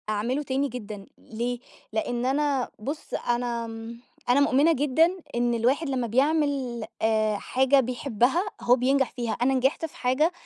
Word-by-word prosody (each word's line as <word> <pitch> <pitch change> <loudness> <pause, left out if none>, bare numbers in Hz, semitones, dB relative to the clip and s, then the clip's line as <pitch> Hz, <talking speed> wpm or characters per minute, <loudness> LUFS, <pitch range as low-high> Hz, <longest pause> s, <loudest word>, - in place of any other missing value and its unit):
أعمله 235 +7 -1
تاني 275 +1 0
جدًا، 210 -4 -7
ليه؟ 240 +2 -4 0.3
لإن 240 +2 -1
أنا 275 -1 +1
بُص، 285 +8 -6
أنا 240 -1 -1
م 225 +1 -8 0.3
أنا 250 +3 +5
مؤمنة 285 +3 +4
جدًا 315 +6 +2 0.2
إن 240 0 +1
الواحد 260 +7 +1
لمّا 255 -3 -1
بيعمل 270 -2 +1 0.2
آآ 215 -1 +2
حاجة 265 +5 +2
بيحبها 255 - +1 0.2
هو 245 - +5
بينجح 265 +1 +1
فيها. 240 -3 -3
أنا 265 +2 +3
نجحت 265 +5 +1
في 320 - -10
حاجة 265 +7 +2
250 Hz, 150 wpm, -26 LUFS, 235-280 Hz, 0.3 s, أنا